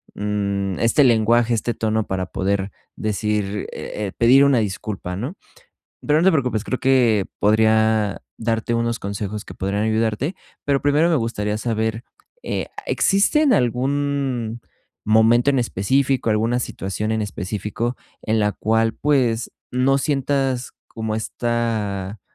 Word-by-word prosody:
mm, 100 -2 -2
este 120 +5 +4
lenguaje, 120 0 +3
este 115 +1 -1
tono 110 -1 -1
para 95 -1 -2
poder 95 +1 -2 0.3
decir, 105 -1 -2
e 105 - -5
eh, 95 - -6
pedir 130 +4 +6
una 140 -2 +4
disculpa, 100 -3 -3
¿no? 130 - -5 0.7
Pero 150 +1 +4
no 175 - +2
te 190 - +7
preocupes, 125 -8 0
creo 130 - -3
que 120 -7 +3
podría 110 -1 +3 0.2
darte 115 +1 -1
unos 115 0 0
consejos 100 +1 -5
que - - -9
podrían 100 +3 -1
ayudarte, 110 - 0 0.3
pero 140 -1 +1
primero 145 +4 +3
me 165 - +3
gustaría 105 -4 -2
saber, 110 0 -2 0.4
eh, - - -3 0.2
¿existen 260 +9 +3
algún 130 -2 -1 0.5
momento 115 +4 +4
en 135 -2 +3
específico 130 +4 +1
alguna 115 +3 +1
situación 105 -1 -3
en 110 - 0
específico, 105 +4 -3 0.2
en 110 0 0
la 105 0 +1
cual 115 +1 +1
pues, 125 -6 +1 0.2
no 130 +2 +2
sientas 135 -2 -1 0.2
como 110 -1 -4
esta, 110 -4 -2
115 Hz, 135 wpm, -21 LUFS, 105-130 Hz, 0.7 s, te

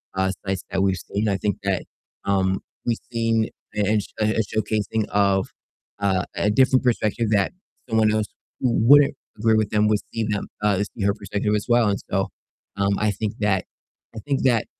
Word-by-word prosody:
uh, 95 0 +1
sites 95 -1 -2
that 95 0 +1
we've 95 -1 +2
seen, 100 +4 -2
I 100 - +1
think 100 +2 -1
that, 100 -2 0 0.4
um, 95 -1 +1 0.2
we've 115 -1 +1
seen 115 -1 +1 0.3
a 105 - +1
a 105 +2 +2
sh 100 - -7
a 110 +1 +2
showcasing 110 0 0
of, 100 -2 +2 0.5
uh, 95 -2 +1
a 105 - +1
different 130 +3 +4
perspective 115 -2 +1
that 100 - +2 0.4
someone 110 -1 +3
else 110 -1 +1 0.3
who 125 - +1 0.2
wouldn't 145 -1 +7 0.2
agree 110 +1 +3
with 110 -2 +1
them 105 0 +2
would 105 -1 +2
see 115 - -1
them 105 -1 -2 0.2
uh, 105 -2 +3
see 105 0 -6
her 100 - +3
perspective 105 0 -2
as 105 - -2
well. 120 -2 +4
And 100 - 0
so, - - +1 0.5
um, 100 0 +1
I 105 -1 +2
think 105 +1 -3
that 100 -3 +1 0.5
I 110 - -5
think 140 -2 +1
that 120 -4 +3
105 Hz, 190 wpm, -23 LUFS, 100-110 Hz, 0.5 s, wouldn't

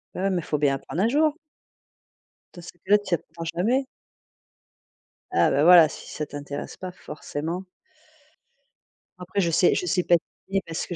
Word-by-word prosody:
Bah, - - -4
ouais, 195 - +1
mais 175 -4 -1
faut 150 - -2
bien 140 -2 +2
apprendre 160 +6 -4
un 220 - +3
jour. 300 +4 +2 1.2
Dans 175 - -9
ces 170 - -11
cas-là 205 +4 +4
tu 190 -4 -1
apprends 165 +1 -9
jamais. 245 +10 +1 1.5
Ah, 375 - +3
ben 140 - +3
voilà, 170 -1 +8
si - - -10
ça 150 - -4
t'intéresse 145 -1 -7
pas, 185 -1 -6
forcément. 160 +1 -6 1.6
Après 185 +3 -2
je 170 -2 +1
sais 175 - +4
je - - -1
sais 180 +1 +1
patiner 190 +3 0
parce 165 -1 -4
que 175 - -5
175 Hz, 165 wpm, -25 LUFS, 155-195 Hz, 1.6 s, voilà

